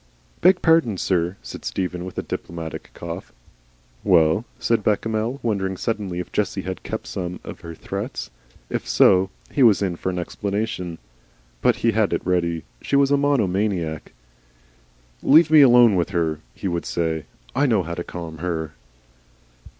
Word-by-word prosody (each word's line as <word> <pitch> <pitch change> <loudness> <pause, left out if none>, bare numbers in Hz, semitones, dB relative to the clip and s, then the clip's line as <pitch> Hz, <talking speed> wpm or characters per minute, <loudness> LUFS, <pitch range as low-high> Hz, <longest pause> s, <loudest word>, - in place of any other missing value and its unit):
"Beg 180 +1 +5
pardon, 160 - +4
sir," 90 0 0
said - - -8
Stephen, 90 -1 -3
with 95 - -8
a - - -1
diplomatic 85 -2 -6
cough. 85 -1 -7 0.7
"Well?" 85 +2 +4
said 115 -2 +1
Bechamel, 110 +4 0
wondering 95 -4 -1
suddenly 105 -6 -3
if 90 - -5
Jessie 100 -2 -1
had 95 0 -5
kept - - -5
some 90 -1 -5
of - - -8
her 85 -1 -9
threats. - - -5 0.4
If - - -4
so, 90 +10 +5 0.2
he 140 - 0
was 110 -5 +6
in 90 -3 -1
for 95 - -2
an 90 - -3
explanation. 100 -1 -3 0.6
But - - +4
he 115 - +5
had 110 -2 +1
it - - -2
ready. 85 -3 0 0.2
She - - -1
was 140 0 +4
a - - +6
monomaniac. 100 - 0 1.1
"Leave 155 +2 +6
me 155 -1 +8
alone 120 -5 +7
with 85 0 +1
her," 80 -5 -1 0.2
he - - -4
would 85 -2 -2
say; 80 -3 -1 0.3
"I 140 +3 +2
know 110 -7 +2
how 85 +1 -5
to 85 - -4
calm 85 -3 -7
her." 80 -3 -3
95 Hz, 160 wpm, -23 LUFS, 85-115 Hz, 1.1 s, me